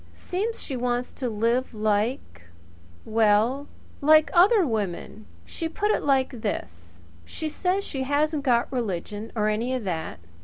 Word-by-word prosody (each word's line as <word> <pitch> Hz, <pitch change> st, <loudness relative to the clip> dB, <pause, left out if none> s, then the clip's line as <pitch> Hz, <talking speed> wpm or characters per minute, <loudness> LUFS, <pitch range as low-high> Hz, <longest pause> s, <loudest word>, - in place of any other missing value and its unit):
Seems 425 Hz, +6 st, -3 dB
she 270 Hz, -, -5 dB
wants 245 Hz, 0 st, -1 dB
to 255 Hz, -3 st, -3 dB
live 230 Hz, +3 st, 0 dB
like 210 Hz, -, -1 dB, 0.6 s
well, 225 Hz, +5 st, +2 dB, 0.3 s
like 310 Hz, +1 st, +5 dB
other 385 Hz, +2 st, +6 dB
women. 200 Hz, -, -3 dB, 0.2 s
She 325 Hz, -, -4 dB
put 420 Hz, +5 st, 0 dB
it -, -, +1 dB
like 265 Hz, -4 st, +1 dB
this: 85 Hz, -, -5 dB, 0.2 s
She 315 Hz, -, -5 dB
says 365 Hz, +5 st, -1 dB
she 270 Hz, -, -5 dB
hasn't 290 Hz, +3 st, +1 dB
got 245 Hz, -1 st, +2 dB
religion, 210 Hz, -2 st, -3 dB
or 210 Hz, -1 st, +1 dB
any 230 Hz, +5 st, 0 dB
of 250 Hz, -, -3 dB
that. 165 Hz, -, -4 dB
245 Hz, 145 wpm, -25 LUFS, 210-290 Hz, 0.6 s, other